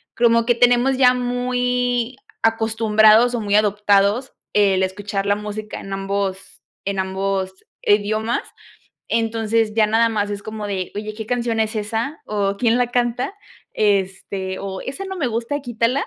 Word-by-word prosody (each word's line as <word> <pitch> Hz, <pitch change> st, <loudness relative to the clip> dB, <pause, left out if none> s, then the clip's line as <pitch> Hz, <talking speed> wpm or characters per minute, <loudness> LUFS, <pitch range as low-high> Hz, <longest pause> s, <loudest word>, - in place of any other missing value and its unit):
como 230 Hz, -1 st, +3 dB
que 240 Hz, -, +4 dB
tenemos 245 Hz, +2 st, +4 dB
ya 250 Hz, -1 st, +6 dB
muy 245 Hz, 0 st, -1 dB, 0.3 s
acostumbrados 220 Hz, +1 st, +4 dB
o 240 Hz, -, -1 dB
muy 205 Hz, -1 st, 0 dB
adoptados 210 Hz, +3 st, +2 dB, 0.2 s
el 195 Hz, -2 st, +3 dB
escuchar 195 Hz, +1 st, -3 dB
la 200 Hz, 0 st, +2 dB
música 210 Hz, 0 st, -6 dB
en 195 Hz, -, -9 dB
ambos 195 Hz, 0 st, -3 dB, 0.2 s
en 195 Hz, -1 st, -2 dB
ambos 190 Hz, 0 st, -2 dB, 0.3 s
idiomas, 215 Hz, +3 st, +1 dB, 0.7 s
entonces, 225 Hz, -1 st, 0 dB
ya 215 Hz, -1 st, +3 dB
nada 230 Hz, +1 st, +3 dB
más 205 Hz, -2 st, -1 dB
es 205 Hz, 0 st, -5 dB
como 215 Hz, -1 st, -5 dB
de: 190 Hz, -3 st, -3 dB
"Oye, 215 Hz, +1 st, -4 dB
¿qué 220 Hz, +1 st, -7 dB
canción 235 Hz, -1 st, -1 dB
es 220 Hz, +1 st, -2 dB
esa?, 225 Hz, +8 st, -3 dB
o, 200 Hz, -1 st, -1 dB
¿quién 235 Hz, +1 st, +2 dB
la 245 Hz, -1 st, +2 dB
canta?", 245 Hz, +6 st, 0 dB, 0.4 s
este, 190 Hz, -2 st, -1 dB
o, 195 Hz, -1 st, -5 dB
"Esa 280 Hz, +9 st, -6 dB
no 380 Hz, 0 st, -5 dB
me 305 Hz, -8 st, -1 dB
gusta, 235 Hz, +5 st, -2 dB
quítala", 240 Hz, +1 st, 0 dB
220 Hz, 155 wpm, -21 LUFS, 200-240 Hz, 0.7 s, ya